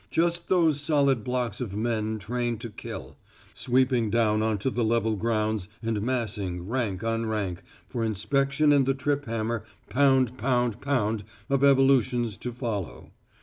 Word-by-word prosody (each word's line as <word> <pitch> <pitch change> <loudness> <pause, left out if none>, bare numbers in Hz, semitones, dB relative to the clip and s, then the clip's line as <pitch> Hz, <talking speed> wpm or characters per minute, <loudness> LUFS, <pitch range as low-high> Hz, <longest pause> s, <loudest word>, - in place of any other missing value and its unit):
Just 170 +1 0
those 165 -6 +3
solid 140 -6 +2
blocks 125 -3 -2
of 105 -5 -4
men 110 0 -1
trained 120 +2 -2
to 115 - -6
kill, - - -8 0.4
sweeping 125 -2 +1
down 110 -1 +2
on 110 -1 +1
to 115 +7 -1
the 120 - 0
level 110 -1 +1
grounds 110 -2 -1
and 110 -2 -1
massing, 105 -7 -2
rank 115 -5 -2
on 115 0 -1
rank, 100 -5 -2 0.3
for 120 -2 -3
inspection 140 +8 +2
and 135 -2 +3
the 135 - +2
trip 145 +1 -1
hammer 115 -1 -2 0.3
pound 130 -2 +3
pound 120 -3 0
pound 115 -7 0 0.3
of 140 0 +2
evolutions 130 -4 +4
to 125 +2 -5
follow. 115 - -5
120 Hz, 150 wpm, -27 LUFS, 110-135 Hz, 0.4 s, evolutions